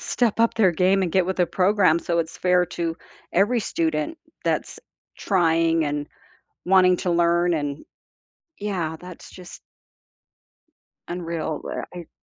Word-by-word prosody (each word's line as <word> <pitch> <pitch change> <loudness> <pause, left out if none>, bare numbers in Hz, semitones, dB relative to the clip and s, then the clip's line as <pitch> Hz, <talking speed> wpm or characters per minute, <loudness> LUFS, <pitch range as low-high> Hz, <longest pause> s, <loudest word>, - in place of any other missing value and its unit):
step 230 -2 0
up 230 - +3
their 195 -6 +3
game 190 +3 +2
and 175 - -2
get 185 -2 +2
with 190 - -2
the 180 -2 +2
program 185 -3 +3
so 170 0 -1
it’s 160 -1 -3
fair 180 -1 +3
to 165 -1 -2 0.4
every 215 +6 +2
student 160 - -2 0.3
that's - - -2 0.4
trying 165 -3 +2
and 145 0 -3 0.6
wanting 185 -1 +5
to 180 - -1
learn 170 +1 +2
and 145 -1 -3 0.9
yeah 165 -5 -2
that's 180 -1 -11
just 180 -2 -12 1.5
unreal, 170 -3 -3
where - - -5
I 175 -2 -8
175 Hz, 135 wpm, -23 LUFS, 165-185 Hz, 1.5 s, wanting